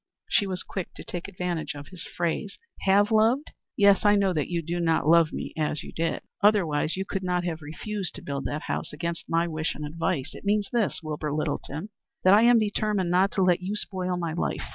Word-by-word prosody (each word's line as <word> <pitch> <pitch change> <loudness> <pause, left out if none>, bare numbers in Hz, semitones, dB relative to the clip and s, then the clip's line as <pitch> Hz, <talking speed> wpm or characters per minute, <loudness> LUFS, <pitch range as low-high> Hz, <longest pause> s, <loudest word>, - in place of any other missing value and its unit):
She 205 - +3
was 185 -1 -3
quick 190 -3 -6
to - - -9
take 175 -1 -6
advantage 175 -4 -3
of 145 0 -9
his 185 -3 -10
phrase. 175 +4 -3 0.3
"Have 205 +3 +5
loved? 225 +7 +3 0.3
Yes, 200 0 +5
I 205 0 +6
know 195 -2 +2
that 150 -4 -1
you 170 -1 -1
do 170 +2 -2
not 165 -3 +1
love 165 -1 +5
me - - -5
as 155 -1 -1
you - - -9
did; 165 0 -2 0.2
otherwise 180 -7 +3
you 190 - -2
could 195 -1 -3
not 180 -1 0
have 165 -2 -3
refused 185 +5 -5
to - - -9
build 140 -1 -4
that 150 +1 -3
house, - - -3
against 170 +2 -4
my 165 +1 +2
wish 155 -1 -2
and 150 - -5
advice. 160 -1 -2
It - - -11
means 205 0 +1
this, 230 -6 0
Wilbur 150 -1 -3
Littleton, 155 +4 -3 0.3
that 185 - +7
I 210 - +7
am 240 +1 +6
determined 210 -4 0
not 185 +2 +4
to 195 - +2
let 180 -1 +3
you 195 +3 -3
spoil 185 -3 -2
my 170 -2 -2
life. 170 - -2
180 Hz, 220 wpm, -26 LUFS, 160-200 Hz, 0.3 s, that